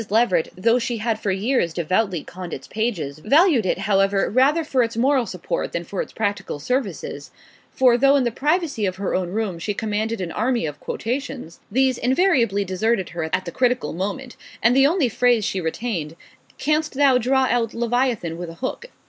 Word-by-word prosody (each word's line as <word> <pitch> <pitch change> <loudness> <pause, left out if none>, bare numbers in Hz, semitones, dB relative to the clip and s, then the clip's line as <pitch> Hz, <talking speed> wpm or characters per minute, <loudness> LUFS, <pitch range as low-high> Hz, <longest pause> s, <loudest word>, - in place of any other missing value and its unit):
Leveret, 215 -5 +2
though 230 +6 +3
she 240 0 -2
had 220 0 -1
for 210 - -2
years 195 -2 0
devoutly 185 0 0
conned 180 -1 -7
its 135 - -11
pages, 175 -11 -3
valued 280 - +4
it, - - +1
however, 195 0 +1
rather 275 +8 +3
for 270 -4 +1
its 230 -1 -1
moral 260 0 +2
support 185 -3 -4
than 170 - -2
for 185 +2 -4
its - - -7
practical 205 -6 -2
services; 185 - -3 0.4
for 245 -2 +3
though 275 +2 +5
in 275 - +3
the 240 - 0
privacy 295 - 0
of 185 - -3
her 195 0 -3
own 185 -1 -1
room 200 -3 -2
she 205 +4 -3
commanded 220 +1 -2
an 180 -3 -4
army 240 0 0
of 150 -1 -5
quotations, 245 - -4
these 260 +2 +2
invariably 250 - +2
deserted 190 +2 0
her 170 -2 -4
at 185 - -1
the 170 - -5
critical 245 -10 0
moment, 205 +9 -4 0.3
and 235 +2 +5
the 270 +1 +6
only 325 -3 +2
phrase 235 -2 +2
she 190 - -2
retained 165 -2 -3 0.4
Canst 305 0 0
thou 270 -2 +4
draw 265 +2 +2
out 230 -2 0
leviathan 235 -8 0
with 175 -1 -5
a 165 - -10
hook? 260 - -5
225 Hz, 190 wpm, -22 LUFS, 185-255 Hz, 0.4 s, the